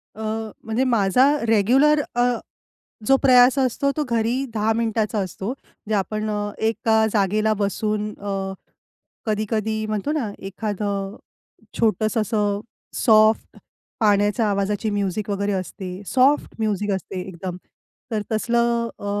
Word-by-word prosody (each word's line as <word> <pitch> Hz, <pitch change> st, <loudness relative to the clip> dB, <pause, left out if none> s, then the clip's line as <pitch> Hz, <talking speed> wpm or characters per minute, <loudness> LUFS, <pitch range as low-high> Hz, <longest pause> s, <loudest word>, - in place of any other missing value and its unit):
अ, 220 Hz, 0 st, -5 dB, 0.4 s
म्हणजे 225 Hz, +4 st, 0 dB
माझा 235 Hz, +1 st, +3 dB, 0.2 s
रेग्युलर 255 Hz, +8 st, +4 dB
अ, 245 Hz, 0 st, +3 dB, 0.7 s
जो 270 Hz, -, +6 dB
प्रयास 255 Hz, 0 st, +6 dB
असतो 270 Hz, +2 st, +1 dB
तो 305 Hz, -, +1 dB
घरी 235 Hz, +3 st, +1 dB
10 220 Hz, +1 st, +2 dB
मिनिटाचा 220 Hz, -1 st, 0 dB
असतो 195 Hz, +3 st, -3 dB, 0.4 s
जे 220 Hz, -, +1 dB
आपण 215 Hz, +2 st, -1 dB
अ, 205 Hz, 0 st, -2 dB
एका 220 Hz, 0 st, +2 dB
जागेला 215 Hz, +1 st, +2 dB
बसून 210 Hz, +1 st, -1 dB
अ, 195 Hz, -1 st, -3 dB, 0.7 s
कधी-कधी 215 Hz, 0 st, -1 dB
म्हणतो 215 Hz, +7 st, -2 dB
ना 260 Hz, -9 st, -1 dB
एखादं 200 Hz, 0 st, -3 dB, 0.6 s
छोटंसं 220 Hz, 0 st, +2 dB
असं 205 Hz, -1 st, 0 dB, 0.4 s
सॉफ्ट 215 Hz, -1 st, +4 dB, 0.4 s
पाण्याच्या 210 Hz, +1 st, +3 dB
आवाजाची 200 Hz, +2 st, 0 dB
म्युझिक 205 Hz, 0 st, -2 dB
वगैरे 200 Hz, 0 st, -1 dB
असते 185 Hz, 0 st, -5 dB
सॉफ्ट 270 Hz, +3 st, +3 dB
म्युझिक 210 Hz, -1 st, 0 dB
असते 190 Hz, -1 st, -3 dB
एकदम. 180 Hz, -1 st, -6 dB, 0.5 s
तर 215 Hz, -2 st, 0 dB
तसलं 235 Hz, +1 st, +1 dB
अ, -, -, -8 dB
215 Hz, 120 wpm, -22 LUFS, 200-230 Hz, 0.7 s, जो